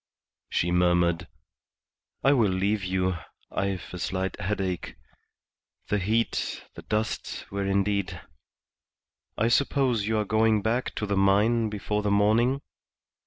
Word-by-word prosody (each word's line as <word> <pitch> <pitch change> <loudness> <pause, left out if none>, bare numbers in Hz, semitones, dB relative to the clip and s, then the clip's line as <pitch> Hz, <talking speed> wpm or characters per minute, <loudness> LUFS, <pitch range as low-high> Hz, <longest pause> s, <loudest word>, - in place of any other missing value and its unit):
She 85 - 0
murmured 85 -1 +2 1.0
"I 135 +2 +5
will 115 -7 +3
leave 100 +2 0
you; 95 -1 0 0.3
I've 95 -2 -2
a 90 - -5
slight 95 +2 -2
headache. 95 -2 -2 0.9
The 105 - +1
heat, 110 +4 -1
the - - -9
dust, 110 0 -3
were 100 0 -2
indeed 100 -3 0 1.2
I 110 - +2
suppose 125 -3 +2
you 110 0 +1
are 105 - 0
going 110 0 +2
back 120 +3 -1
to 105 - -2
the 100 -1 -1
mine 105 +4 +3
before 105 0 -2
the 105 - 0
morning?" 110 +7 +3
100 Hz, 125 wpm, -27 LUFS, 95-110 Hz, 1.2 s, I